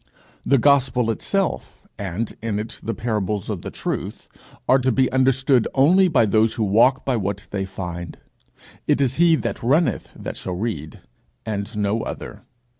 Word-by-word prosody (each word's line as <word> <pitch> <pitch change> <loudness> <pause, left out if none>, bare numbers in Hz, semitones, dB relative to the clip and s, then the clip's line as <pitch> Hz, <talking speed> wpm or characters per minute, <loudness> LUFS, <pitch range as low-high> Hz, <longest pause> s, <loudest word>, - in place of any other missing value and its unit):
The 140 - +3
gospel 130 -3 +3
itself, 195 - -2
and 100 +3 -3
in 110 -2 -2
it 110 +2 -5
the 115 - -3
parables 105 -4 -2
of - - -4
the - - -6
Truth, - - -5 0.4
are 130 - +5
to 130 +1 +1
be 130 +1 +2
understood 130 -1 +3
only 175 +8 +5
by 135 -9 +3
those 110 +1 +2
who 115 - 0
walk 115 +7 +3
by 130 - +1
what 100 -1 -3
they 95 -1 -2
find. 85 -3 -6 0.7
It - - +3
is 135 -2 +1
he 170 -1 +6
that - - -3
runneth 135 - +1
that - - -6
shall 90 - -4
read, 85 -8 -4 0.4
and 105 0 -4
no 105 +2 0
other. - - -7
115 Hz, 165 wpm, -22 LUFS, 100-130 Hz, 0.7 s, he